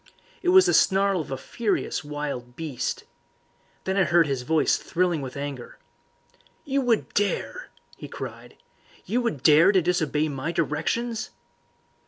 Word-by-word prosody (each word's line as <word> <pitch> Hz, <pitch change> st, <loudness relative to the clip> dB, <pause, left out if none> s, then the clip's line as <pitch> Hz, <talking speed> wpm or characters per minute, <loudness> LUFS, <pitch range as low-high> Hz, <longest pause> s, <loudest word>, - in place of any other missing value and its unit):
It 360 Hz, -, +1 dB
was 375 Hz, +1 st, +7 dB
the 375 Hz, -, +2 dB
snarl 195 Hz, -2 st, +3 dB
of -, -, -9 dB
a 135 Hz, -, -2 dB
furious 205 Hz, -, -2 dB
wild 145 Hz, -5 st, -5 dB
beast. 155 Hz, -6 st, -4 dB, 0.8 s
Then 190 Hz, +1 st, -1 dB
I 195 Hz, -, +5 dB
heard 170 Hz, -1 st, +4 dB
his 135 Hz, -3 st, -2 dB
voice 155 Hz, +5 st, +2 dB
thrilling 175 Hz, -3 st, -1 dB
with 130 Hz, 0 st, -7 dB
anger. 140 Hz, -3 st, -6 dB, 0.9 s
"You 275 Hz, -1 st, 0 dB
would 240 Hz, -4 st, 0 dB
dare!" 205 Hz, -, -1 dB, 0.3 s
he -, -, -8 dB
cried. -, -, -8 dB, 0.5 s
"You 245 Hz, +3 st, 0 dB
would 195 Hz, -, -3 dB
dare 160 Hz, +5 st, +6 dB
to 195 Hz, -, +4 dB
disobey 160 Hz, -3 st, 0 dB
my 145 Hz, +2 st, -3 dB
directions!" 170 Hz, +9 st, -1 dB
170 Hz, 145 wpm, -25 LUFS, 145-205 Hz, 0.9 s, was